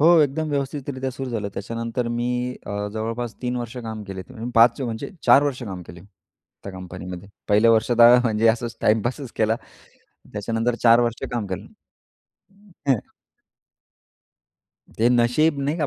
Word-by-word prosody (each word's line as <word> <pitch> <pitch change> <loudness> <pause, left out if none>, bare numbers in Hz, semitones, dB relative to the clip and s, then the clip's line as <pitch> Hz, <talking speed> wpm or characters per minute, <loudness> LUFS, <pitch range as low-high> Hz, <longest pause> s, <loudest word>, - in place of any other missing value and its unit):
हो, 155 - +5
एकदम 150 +2 0
व्यवस्थितरीत्या 140 -2 -3
सुरू 130 0 -6
झालं. 105 -3 -2
त्याच्यानंतर 115 +3 -3
मी 120 +1 -1 0.4
अ, 100 - -5 0.2
जवळपास 115 +1 -3
3 125 0 -1
वर्ष 120 +1 -5
काम 110 -3 -6
केले. 95 -1 -7 0.3
5 115 +3 +5
म्हणजे 115 -3 -4 0.2
4 140 - +7
वर्ष 135 -3 -2
काम 95 -5 -6
केले 85 - -11 0.6
त्या 100 - -6
कंपनीमध्ये. 90 0 -8 0.2
पहिल्या 105 +3 +5
वर्षात 115 +1 +2
हं, 120 +1 +9
म्हणजे 115 -1 +2
असचं 120 +1 +1
टाईमपासच 120 +5 0
केला. 110 0 +2 0.8
त्याच्यानंतर 115 +3 -1
4 115 0 +7
वर्ष 120 -1 -1
काम 120 -4 -2
केलं. 95 -2 -5 1.2
हं. 125 -6 +4 2.0
ते 115 +2 +4
नशीब 125 +6 +3
नाही 145 +4 -1
का? 150 - 0
115 Hz, 145 wpm, -23 LUFS, 110-125 Hz, 2.0 s, हं